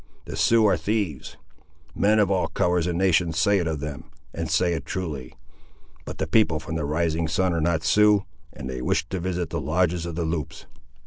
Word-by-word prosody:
The - - -6
Siouxes 115 -1 +4
are 100 -4 +4
thieves. 90 - -3 0.6
Men 105 +2 +3
of 105 -2 +3
all 95 -2 +1
colours 90 -1 0
and 85 -1 -1
nations 90 -3 +2
say 100 +5 +3
it 85 - -1
of 80 -3 -3
them, 75 +1 -6 0.3
and 85 -1 -4
say 85 +3 +2
it 75 -5 -3
truly. 75 -5 -5 0.7
But - - -7
the - - -1
people 80 -3 +2
from 80 +1 -7
the 80 -2 -2
rising 80 +2 0
sun 90 +3 +1
are 85 - 0
not 85 0 +1
Siouxes, 105 -1 +4 0.3
and 70 -3 -8
they 65 -1 -5
wish 75 - 0
to 95 - -3
visit 90 -1 -3
the - - -2
lodges 85 +3 0
of 85 - -5
the 85 -1 -2
Loups." 80 -3 -4
85 Hz, 205 wpm, -24 LUFS, 80-95 Hz, 0.7 s, Siouxes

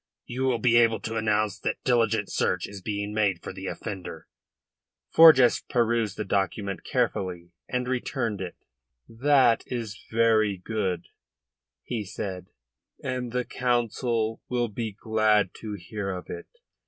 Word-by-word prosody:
You 130 +2 -2
will 130 -2 +2
be 120 +1 +4
able 115 -1 +4
to 115 - -4
announce 110 -2 +1
that - - -3
diligent 115 -4 +2
search 90 -1 0
is 100 -2 -9
being 100 +1 -3
made 100 -5 +1
for - - -6
the 95 0 -7
offender." 95 -4 -6 0.9
Forjas 150 -7 +8
perused 115 -3 +1
the 105 - -3
document 100 0 -1
carefully, 90 -2 -1 0.2
and 125 -1 -1
returned 115 -5 -2
it. 90 -2 -5 0.5
"That 130 0 +4
is 115 -4 -4
very 110 -3 +3
good," 90 -3 -3 0.7
he 115 -4 -3
said, 95 -2 -6 0.6
"and 125 -2 -3
the 125 0 -1
Council 120 -2 0
will 120 -2 0
be 110 +1 -4
glad 110 -2 +2
to 110 -2 -6
hear 100 +2 -5
of 90 -1 -5
it. - - -7
110 Hz, 140 wpm, -26 LUFS, 100-120 Hz, 0.9 s, Forjas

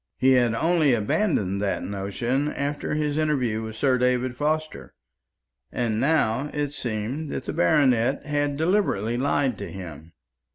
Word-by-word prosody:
He 130 +1 +4
had 120 -3 +3
only 160 -2 +3
abandoned 105 - 0
that 100 -1 -1
notion 120 +9 -2
after 145 +1 -2
his 150 0 -1
interview 130 -8 0
with 110 0 -6
Sir 130 +2 +2
David 125 0 +1
Forster; 155 +3 -2 0.8
and 115 -3 -1
now 140 -1 +1
it 145 -1 -2
seemed 125 +5 -4
that - - -4
the - - -3
baronet 140 -6 +2
had 145 -1 -1
deliberately 160 - +1
lied 130 -2 0
to 100 - -6
him. 80 -4 -9
130 Hz, 140 wpm, -25 LUFS, 110-150 Hz, 0.8 s, He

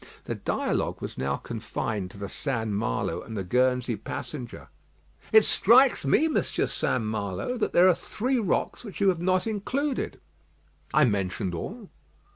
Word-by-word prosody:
The - - -2
dialogue - - -1
was - - -6
now 70 +1 -1
confined 110 -3 -4
to 100 - -12
the 100 0 -5
St. 115 -1 -2
Malo 100 - -1
and 110 -1 -7
the 95 - -2
Guernsey 125 +3 +1
passenger. 120 +4 -7 0.6
"It 220 -1 +7
strikes 245 - +5
me, 300 - +4
Monsieur 315 - 0
St. 125 - -1
Malo, 110 - -2
that - - 0
there 180 +2 +6
are 185 - +6
three 250 +9 -1
rocks 210 +2 -1
which 210 -5 -8
you 200 -1 +4
have 175 -3 0
not 185 0 +2
included." 255 +7 -2 0.7
"I 150 -1 +5
mentioned 95 -3 -1
all." 205 - -6
130 Hz, 155 wpm, -27 LUFS, -, 0.7 s, It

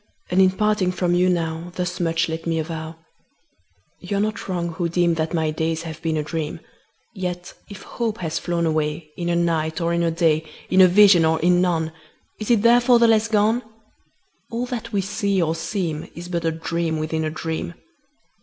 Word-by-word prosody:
And, 185 +2 +4
in 190 - +6
parting 210 -1 +1
from 180 -1 0
you 180 +1 +3
now, 165 0 -2
Thus 180 0 -3
much 165 -1 +1
let 160 +1 -5
me 165 -1 0
avow 160 0 -4 1.0
You 195 +2 -3
are - - +1
not 215 +1 -2
wrong, 175 -2 -1
who 170 0 -2
deem 170 0 +2
That 160 -1 -2
my 160 -1 0
days 160 +1 -2
have 160 -1 -8
been 160 -1 -1
a 150 - -1
dream: 155 0 -4 0.5
Yet 180 -3 -5 0.2
if 200 -2 -10
hope 230 -2 -3
has 165 -4 -3
flown 170 -1 -1
away 155 0 -1
In 175 -1 -3
a 170 - +1
night, 165 -2 0
or 170 0 0
in 170 - +1
a 170 - +2
day, 160 -1 +2 0.3
In 185 - +6
a 185 - +9
vision 190 -2 +6
or 160 0 +2
in 175 +1 +4
none, 165 -3 0 0.5
Is 215 - -5
it 230 -3 +3
therefore 240 +1 +5
the 235 0 +5
less 225 0 +3
gone? 220 +2 +2 0.9
All 235 +1 -2
that 235 -2 -5
we 200 -2 +1
see 200 0 -1
or 160 -2 +1
seem 165 -2 -3
Is 175 +1 -8
but 170 -2 -2
a 165 - +2
dream 165 0 -2
within 160 +1 -2
a 155 - -1
dream. 160 - -4
170 Hz, 200 wpm, -22 LUFS, 160-190 Hz, 1.0 s, a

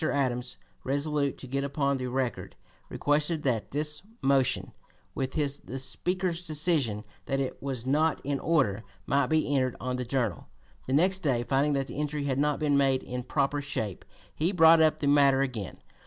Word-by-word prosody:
Adams, 125 -3 -1 0.3
resolute 140 +1 -1
to - - -8
get 135 +2 -2
upon 140 -1 0
the 130 -1 -3
record, 125 -2 -3 0.3
requested 150 +2 +1
that 120 -6 -1
his 150 +1 -2 0.2
motion 135 -2 +2 0.4
with 130 -1 -3
the 145 -3 -3
Speaker's 175 +6 -2
decision 150 -9 +1 0.2
that 135 0 0
it 135 -1 -3
was 130 -4 -4
not 155 +4 +2
in 140 0 -1
order 130 -11 +1 0.2
might 140 -1 +2
be 155 -1 +1
entered 130 -2 +1
on 125 0 -2
the 125 - -2
Journal. 120 -6 -2 0.4
The 130 - -1
next 185 +6 +3
day, 135 -9 0
finding 140 +4 +1
that 135 -1 0
this - - -8
entry 150 -1 -2
had 135 -1 -1
not 150 0 +2
been 145 -2 +2
made 135 -1 +2
in 125 0 -4
proper 140 +3 0
shape, 110 -9 -4 0.3
he 165 +5 0
brought 165 -3 +7
up 155 -1 +3
the 145 - +1
matter 140 -1 +5
again. 120 -8 -5
140 Hz, 175 wpm, -28 LUFS, 130-150 Hz, 0.4 s, brought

